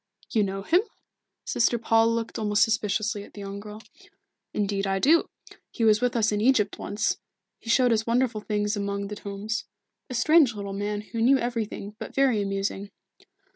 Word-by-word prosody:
"You 220 Hz, -, +2 dB
know 195 Hz, -1 st, -2 dB
him?" 350 Hz, -, +4 dB, 0.6 s
Sister 240 Hz, +1 st, +2 dB
Paul 225 Hz, 0 st, +3 dB
looked 230 Hz, 0 st, -3 dB
almost 210 Hz, -1 st, +3 dB
suspiciously 215 Hz, -1 st, 0 dB
at -, -, -16 dB
the 205 Hz, -, -8 dB
young 200 Hz, 0 st, -6 dB
girl. 210 Hz, +1 st, -10 dB, 0.7 s
"Indeed 200 Hz, -1 st, -1 dB
I 195 Hz, 0 st, +1 dB
do. 310 Hz, +11 st, +4 dB, 0.4 s
He 230 Hz, -, -4 dB
was 215 Hz, -1 st, +4 dB
with 250 Hz, 0 st, +1 dB
us 220 Hz, -2 st, +2 dB
in 210 Hz, 0 st, 0 dB
Egypt 215 Hz, -4 st, +2 dB
once. 210 Hz, +2 st, -1 dB, 0.4 s
He 225 Hz, -, -10 dB
showed 250 Hz, +1 st, +4 dB
us 220 Hz, 0 st, +1 dB
wonderful 235 Hz, -2 st, +1 dB
things 210 Hz, 0 st, -1 dB
among 200 Hz, 0 st, -3 dB
the 210 Hz, -, -5 dB
tombs. 205 Hz, +2 st, -4 dB, 0.4 s
A 255 Hz, -, -4 dB
strange 300 Hz, -2 st, +4 dB
little 200 Hz, -1 st, -5 dB
man, 205 Hz, +1 st, -2 dB
who 225 Hz, +2 st, -5 dB
knew 265 Hz, +4 st, +5 dB
everything, 225 Hz, -4 st, -4 dB
but -, -, -8 dB
very 265 Hz, -6 st, +3 dB
amusing." 195 Hz, 0 st, -3 dB
215 Hz, 175 wpm, -26 LUFS, 205-230 Hz, 0.7 s, knew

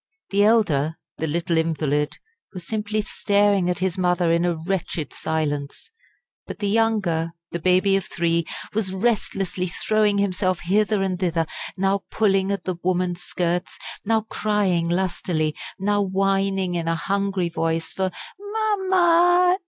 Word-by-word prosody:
The 200 Hz, +1 st, +3 dB
elder, 165 Hz, -9 st, +3 dB, 0.2 s
the 160 Hz, -, -1 dB
little 170 Hz, +2 st, 0 dB
invalid, 150 Hz, -2 st, 0 dB, 0.4 s
was 180 Hz, -3 st, -7 dB
simply 215 Hz, +1 st, -1 dB
staring 205 Hz, -3 st, +2 dB
at 180 Hz, -, 0 dB
his 185 Hz, 0 st, -1 dB
mother 180 Hz, -1 st, +2 dB
in 170 Hz, +1 st, +2 dB
a 175 Hz, -1 st, +1 dB
wretched 170 Hz, -1 st, -3 dB
silence; 150 Hz, -, -3 dB, 0.6 s
but -, -, -6 dB
the 205 Hz, -, -2 dB
younger, 200 Hz, -7 st, +1 dB, 0.2 s
the 170 Hz, -, -3 dB
baby 185 Hz, +3 st, +3 dB
of 195 Hz, -1 st, 0 dB
three, 170 Hz, -1 st, 0 dB, 0.3 s
was 195 Hz, -3 st, -1 dB
restlessly 195 Hz, -4 st, -1 dB
throwing 210 Hz, +3 st, +1 dB
himself 185 Hz, -2 st, 0 dB
hither 205 Hz, +3 st, +2 dB
and 185 Hz, -2 st, -2 dB
thither, 170 Hz, -3 st, +1 dB, 0.3 s
now 195 Hz, +1 st, +1 dB
pulling 195 Hz, -2 st, +2 dB
at 200 Hz, -3 st, -2 dB
the 185 Hz, -2 st, -3 dB
woman's 180 Hz, -1 st, 0 dB
skirts, 175 Hz, 0 st, -2 dB, 0.3 s
now 220 Hz, +1 st, +2 dB
crying 205 Hz, -6 st, 0 dB
lustily, 170 Hz, -3 st, -1 dB, 0.2 s
now 205 Hz, +1 st, +1 dB
whining 195 Hz, -1 st, +1 dB
in 170 Hz, -1 st, -2 dB
a 165 Hz, -, +1 dB
hungry 195 Hz, 0 st, -1 dB
voice, 165 Hz, 0 st, -1 dB
for 190 Hz, -1 st, 0 dB, 0.3 s
"Máma! 370 Hz, -4 st, +3 dB
190 Hz, 140 wpm, -23 LUFS, 170-205 Hz, 0.6 s, The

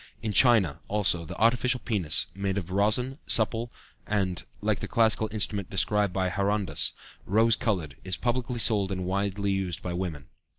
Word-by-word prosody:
In 110 Hz, -2 st, -2 dB
China, 110 Hz, -, +4 dB
also, 95 Hz, -5 st, +2 dB
the -, -, -8 dB
artificial 125 Hz, +3 st, +2 dB
penis 95 Hz, -11 st, 0 dB
made 100 Hz, 0 st, -2 dB
of 90 Hz, -2 st, -4 dB
rosin, 110 Hz, +8 st, +1 dB
supple 115 Hz, +2 st, +2 dB, 0.4 s
and 95 Hz, -4 st, -1 dB, 0.2 s
(like -, -, 0 dB
the -, -, -5 dB
classical 110 Hz, -1 st, +2 dB
instrument 105 Hz, -3 st, 0 dB
described 100 Hz, +1 st, +1 dB
by 95 Hz, 0 st, 0 dB
Herondas) 100 Hz, 0 st, 0 dB, 0.3 s
rose 110 Hz, +3 st, +4 dB
colored 90 Hz, -, -2 dB
is 95 Hz, -2 st, -2 dB
publicly 125 Hz, 0 st, -2 dB
sold 105 Hz, -4 st, +1 dB
and 95 Hz, -1 st, -3 dB
widely 100 Hz, +1 st, -1 dB
used 95 Hz, -3 st, -3 dB
by 90 Hz, -, -3 dB
women. 85 Hz, -6 st, -4 dB
100 Hz, 160 wpm, -27 LUFS, 95-110 Hz, 0.4 s, China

